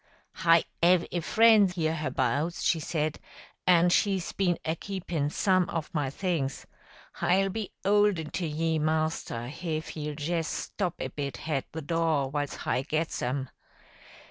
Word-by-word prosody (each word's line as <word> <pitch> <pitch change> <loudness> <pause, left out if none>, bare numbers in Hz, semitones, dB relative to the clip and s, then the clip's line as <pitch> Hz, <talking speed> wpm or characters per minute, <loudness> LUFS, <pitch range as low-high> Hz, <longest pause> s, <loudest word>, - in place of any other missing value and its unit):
"Hi 165 -2 +5 0.2
'ave 175 0 +4
a 175 - -1
friend 215 +1 +5
'herhabouts," 155 -2 -1
she 165 - +2
said, 155 -1 -2 0.5
"an' 175 -1 +6
she's 190 0 +1
been 180 -3 +1
a 160 - 0
keepin' 170 -6 -3
some 185 +3 +2
of 165 -1 -4
my 145 -4 0
things. 150 -3 -2 0.5
Hi'll 195 +2 +2
be 210 +1 -4 0.2
'olden 200 -6 +3
to 175 -2 -2
ye, 160 +1 0
master, 155 -6 -1
hif 155 +3 -4
ye'll 150 -1 -5
jes 165 +1 -1
stop 180 -4 -3
a - - -3
bit 140 -2 -4
hat 150 -4 -1
the 160 0 -6
door 160 -3 0
whiles 145 -1 -2
hi - - -1
gets 155 +3 -2
'em. 130 +1 -2
165 Hz, 145 wpm, -28 LUFS, 150-180 Hz, 0.5 s, an